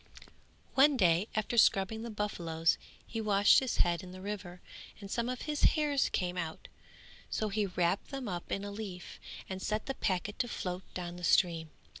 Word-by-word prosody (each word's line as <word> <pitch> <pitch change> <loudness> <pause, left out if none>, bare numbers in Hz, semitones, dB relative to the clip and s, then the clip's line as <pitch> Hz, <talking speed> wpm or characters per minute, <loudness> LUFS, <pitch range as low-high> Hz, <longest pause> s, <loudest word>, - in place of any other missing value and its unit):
One 275 +1 +5
day 180 -1 +3
after 215 +2 +1
scrubbing 205 +2 +3
the 235 - -5
buffaloes 170 -6 0 0.3
he 225 - -4
washed 205 -1 +5
his 260 -3 -2
head 175 0 +2
in 185 -1 -10
the 185 - -9
river 190 -2 -6 0.4
and 200 -2 -9
some 235 0 0
of 255 -1 -4
his 300 -1 -2 0.2
hairs 290 -3 +2
came 180 0 -1
out; 160 -2 -5 0.6
so 215 - -1
he 205 0 0
wrapped 180 +1 0
them 270 -3 -5
up 175 -3 -5
in 195 - -1
a 205 - -5
leaf 200 -4 -7 0.3
and 190 0 -5
set 215 +2 -1
the 270 - -2
packet 200 -2 -2
to 245 - +1
float 180 -5 -5
down 175 -1 -5
the 180 - -10
stream. 165 -2 +3
200 Hz, 185 wpm, -32 LUFS, 180-220 Hz, 0.6 s, One